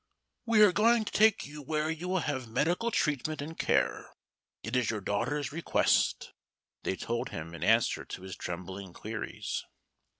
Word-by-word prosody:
"We 220 -2 +6
are 205 - +7
going 225 +3 +4
to - - -5
take 220 0 +4
you 150 +1 -9
where 155 +2 -1
you 160 +3 -5
will 185 -1 +1
have 130 -6 -2
medical 175 - +1
treatment 155 - 0
and 155 +3 -5
care; - - +1 0.5
it - - -3
is 125 -2 +2
your 110 - -1
daughter's 125 +8 -1
request," 165 +3 +1 0.5
they 95 - -1
told 115 +4 -3
him 80 +2 -6
in 85 - -6
answer 115 +1 +3
to - - -8
his 95 -1 -6
trembling 95 +1 -6
queries. - - -4
145 Hz, 165 wpm, -30 LUFS, 110-175 Hz, 0.5 s, are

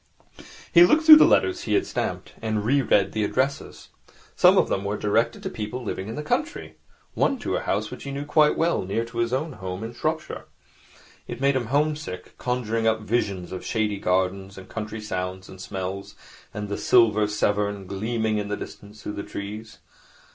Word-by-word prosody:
He 170 -1 +9
looked 310 - +4
through 315 -1 +11
the - - +7
letters 365 -1 +2
he - - +1
had 380 - +2
stamped, - - -4
and 110 -2 -1
re 140 +4 +3
read 100 -6 +2
the 110 - -1
addresses. 130 +6 -2 0.5
Some - - +6
of - - +4
them 95 - -1
were 100 +1 -2
directed 115 +3 0
to - - -2
people 110 +4 -5
living 95 -3 -4
in 110 - -5
the 150 - -4
country, 300 - -3 0.4
one 275 - +1
to 245 - -3
a - - 0
house 105 +2 -2
which - - -8
he 140 - -5
knew 140 +1 -4
quite 150 0 +3
well, 165 +1 +1
near 100 +5 -2
to 115 0 -7
his 115 0 0
own 140 +4 -2
home 95 -1 -6
in 115 +1 -6
Shropshire. 155 +6 -3 0.8
It - - -6
made 140 0 +2
him 125 -4 -1
home 150 +4 +2
sick, 120 -12 -8
conjuring 115 -2 -1
up 110 0 +2
visions 100 -5 -2
of 95 - -6
shady 105 -3 -1
gardens 95 +1 -1
and 95 -1 -10
country 110 +1 -6
sounds 95 -2 -4
and 95 0 -11
smells, 95 0 -5 0.4
and 105 0 -5
the 100 - -4
silver 110 -3 +4
Severn 105 -1 -1
gleaming 110 +2 -1
in 105 - -3
the 105 0 -3
distance 105 +1 -10
through 105 - -4
the 100 - -4
trees. 105 +3 -7
110 Hz, 200 wpm, -24 LUFS, 100-130 Hz, 0.8 s, through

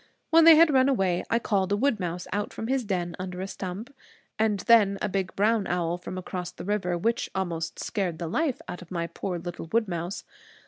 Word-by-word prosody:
When 325 0 +7
they 330 -1 +10
had 315 -1 +6
run 260 0 +5
away, 190 -9 +1
I 230 - +3
called 200 -5 0
a 205 - +2
wood 245 -1 +1
mouse 180 -1 -3
out 205 +1 -2
from 220 - -5
his 260 +2 0
den 175 -4 -2
under 180 -1 -5
a 190 - -2
stump; 195 +7 -6 0.5
and 215 -3 +1
then 210 -4 +5
a - - -1
big 190 -2 -2
brown 215 0 +2
owl 175 -1 -1
from 185 - -7
across 180 -1 -5
the - - -10
river 190 -4 0
which 230 +7 0
almost 170 -4 -3
scared 185 -6 -2
the 170 - -4
life 285 - -1
out 175 - -6
of 175 - -13
my 170 -2 -2
poor 175 +2 -4
little 175 -1 -7
wood 225 -1 +2
mouse. 175 +2 -4
190 Hz, 220 wpm, -27 LUFS, 175-225 Hz, 0.5 s, they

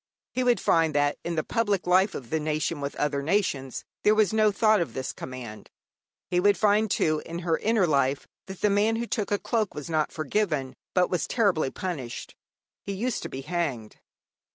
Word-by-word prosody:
He 255 - 0
would 245 -1 +3
find 160 -2 +2
that 145 0 +2
in 170 - -3
the 155 - 0
public 205 -3 0
life 185 +3 +3
of 120 -4 -8
the 160 - +1
nation 155 0 -1
with 140 0 -4
other 145 -1 0
nations 145 - -1 0.2
there 210 - +4
was 215 -2 +3
no 215 -1 +4
thought 215 0 +3
of 170 - -4
this 130 0 -3
command. 120 -5 -8 0.6
He 180 - +1
would 200 +2 +4
find, 210 +1 +3
too, 155 -4 +1
in 170 - -6
her 165 -2 +1
inner 220 -3 +2
life, 140 -3 +1 0.2
that 190 -1 -9
the 210 - +3
man 210 +3 +3
who 235 +1 -2
took 215 -3 -2
a 205 - +2
cloak 220 -1 -1
was 150 +2 -6
not 155 -1 +1
forgiven, 155 -4 -1 0.2
but 180 -1 +3
was 180 - 0
terribly 195 - +2
punished 145 -8 -5 0.5
he 200 - -4
used 230 +5 -2
to - - -5
be 135 - -6
hanged. 140 -8 -3
175 Hz, 200 wpm, -26 LUFS, 145-205 Hz, 0.6 s, there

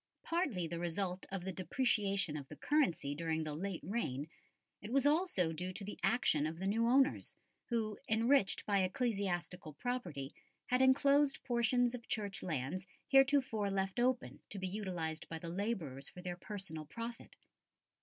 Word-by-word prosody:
Partly 300 - 0
the 165 +1 -4
result 180 +2 -2
of 195 -2 -3
the 190 - -1
depreciation 195 - +1
of 140 -3 -5
the - - -9
currency 180 - +1
during 160 +1 -1
the 155 -1 -4
late 180 +3 -4
reign, 150 - -2 0.5
it 210 - -7
was 275 +1 +3
also 290 - +3
due 180 +3 -3
to 200 - -5
the 210 - -7
action 195 - +3
of 160 +1 -5
the 190 - -4
new 225 +4 +2
owners 270 +3 +3 0.3
who, 220 -3 -1
enriched 225 0 +3
by 200 -1 +3
ecclesiastical 185 - -1
property, 165 - -3 0.3
had 250 +1 +2
enclosed 275 +2 +4
portions 245 -1 +2
of 240 -2 -7
Church 205 -2 -2
lands 165 +4 -3 0.2
heretofore 270 -6 +4
left 195 +2 -1
open 250 0 +1
to 205 - -6
be 190 -1 -2
utilised 180 -5 -3
by 165 - -4
the 165 +1 -6
labourers 170 - -2
for 180 - -11
their 180 -1 -3
personal 175 -5 -6
profit. 230 +6 -7
195 Hz, 160 wpm, -36 LUFS, 170-240 Hz, 0.5 s, enclosed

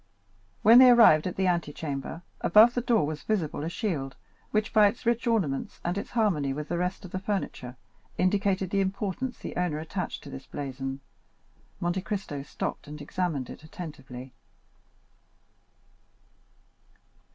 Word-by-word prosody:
When 230 +3 +9
they 255 -1 +9
arrived 225 -10 +7
at 180 - -4
the 190 - 0
antechamber, 160 -2 -2 0.2
above 220 +6 +6
the 245 - 0
door 235 - +2
was 150 0 -4
visible 160 -5 -1
a 160 - -2
shield, 160 - -3 0.3
which, 215 +1 0
by 215 -2 +7
its 225 +4 -4
rich 235 +1 +1
ornaments 185 -13 0
and 175 +1 0
its 200 - -4
harmony 175 - +1
with 150 +2 -5
the 170 0 -1
rest 180 +2 -2
of 180 - -10
the 185 - -3
furniture, 185 - -4 0.4
indicated 190 0 +1
the 200 - +2
importance 200 +6 -2
the - - -7
owner 175 -4 0
attached 160 +5 -4
to 140 - -10
this 135 0 -9
blazon. 135 -1 -5 0.8
Monte 175 +2 -1
Cristo 190 -8 -4
stopped 140 - -5
and 150 +1 -8
examined 145 -3 -2
it - - -10
attentively. 135 -6 -9
180 Hz, 150 wpm, -28 LUFS, 145-205 Hz, 0.8 s, When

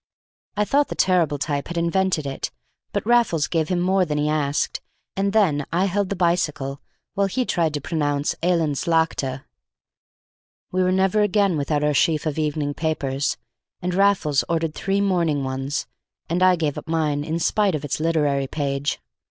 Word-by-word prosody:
I 210 - +2
thought 285 +5 +2
the - - -5
terrible 170 -6 +2
type 145 0 -2
had 175 - -5
invented 170 -1 +1
it, 135 -1 -3 0.4
but - - -2
Raffles 235 -10 +3
gave 160 -2 -1
him 180 -2 +1
more 185 +2 +2
than 150 -4 -2
he 150 0 +1
asked, 150 -2 0 0.3
and 195 +1 0
then 180 -9 +2
I 175 +3 +2
held 200 0 0
the 200 - -2
bicycle 160 -6 0 0.3
while 200 0 +1
he 250 +6 -1
tried 165 -7 0
to 145 - -3
pronounce 145 -1 -1
Eland's 165 -5 0
Laagte. 150 -5 0 1.3
We 185 - +1
were 185 0 +2
never 190 +3 +2
again 200 -2 +2
without 145 0 0
our 150 0 +2
sheaf 155 +2 +2
of 155 0 -2
evening 150 -1 -1
papers, 140 -3 -1 0.4
and 180 0 -2
Raffles 185 -7 +3
ordered 165 -2 0
three 195 +3 -1
morning 170 -7 +1
ones, 135 +2 -3 0.4
and 175 +2 -1
I 185 0 +6
gave 155 -4 -2
up - - -14
mine 155 -3 0
in 160 +2 -2
spite 195 +1 +1
of 150 -1 -4
its 145 - -2
literary 150 -4 +1
page. 140 0 -2
160 Hz, 175 wpm, -23 LUFS, 145-185 Hz, 1.3 s, I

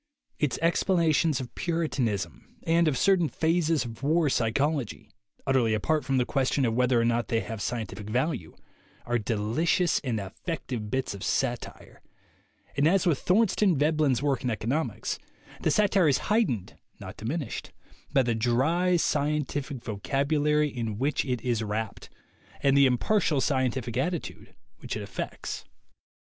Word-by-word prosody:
Its 140 -5 0
explanations 165 -3 +2
of 125 -2 -7
puritanism 125 - -2
and 165 0 +3
of 140 -4 +1
certain 185 -5 +3
phases 165 -2 +1
of 115 -1 -8
war 155 +1 +2
psychology, 130 +2 -1 0.3
utterly 125 -5 +2
apart 155 +8 0
from 135 +1 0
the 125 - +2
question 135 0 +1
of 115 - +1
whether 125 0 +3
or 115 - +2
not 120 0 +1
they 115 - +1
have 110 -2 -6
scientific 105 -3 -4
value, 125 - -1 0.5
are 120 0 0
delicious 115 - +1
and 120 -5 -1
effective 110 - -5
bits 130 -1 -1
of 100 - -8
satire; - - -3 0.7
and, 140 +2 +3
as 190 +2 +3
with 165 -6 +2
Thor 215 +5 +3
stein 190 -4 +2
Veblen's 150 -3 +2
work 140 -4 0
in 125 - 0
economics, 120 +8 -2 0.4
the - - +1
satire 200 -5 +3
is 140 - +4 0.2
heightened, 125 - 0 0.2
not - - -8
diminished, 130 +3 -4 0.4
by 135 -2 +4
the 120 -1 0
dry, 135 +11 +2
scientific 145 -4 -1
vocabulary 145 +7 +1
in 115 -5 -4
which 140 +5 0
it 125 -3 -2
is 120 -3 0
wrapped 105 0 -4 0.5
and 140 0 +4
the 140 -1 +6
impartial 155 - +2
scientific 130 -4 0
attitude 170 +5 -3 0.2
which - - -4
it - - -5
affects. - - -5
135 Hz, 145 wpm, -27 LUFS, 120-160 Hz, 0.7 s, the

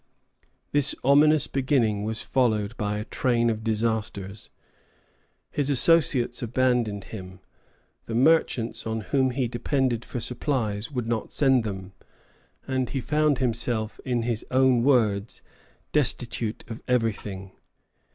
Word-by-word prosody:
This 145 0 +2
ominous 145 +2 +5
beginning 125 -7 +1
was 110 +1 -2
followed 115 -4 +1
by 105 -2 -2
a 105 - -4
train 120 0 +1
of 110 0 -4
disasters. 110 -3 -2 1.0
His 145 -1 -1
associates 135 -3 +3
abandoned 120 -4 0
him; 95 -3 -8 0.7
the 115 - -4
merchants 125 -5 +2
on 110 0 -2
whom 130 +6 +1
he 125 0 -1
depended 120 0 -1
for 125 - -5
supplies 115 -3 -2
would 125 -5 -3
not 115 -2 -2
send 135 -4 +3
them, 95 -3 -6 0.7
and 130 -2 -1
he 135 - -2
found 150 +3 +1
himself, 115 -3 -1
in 120 -3 -1
his 115 -2 -1
own 130 -2 +4
words 110 -6 +1 0.5
"destitute 120 -5 -1
of 115 0 -7
everything." 105 -5 -1
120 Hz, 120 wpm, -26 LUFS, 110-130 Hz, 1.0 s, ominous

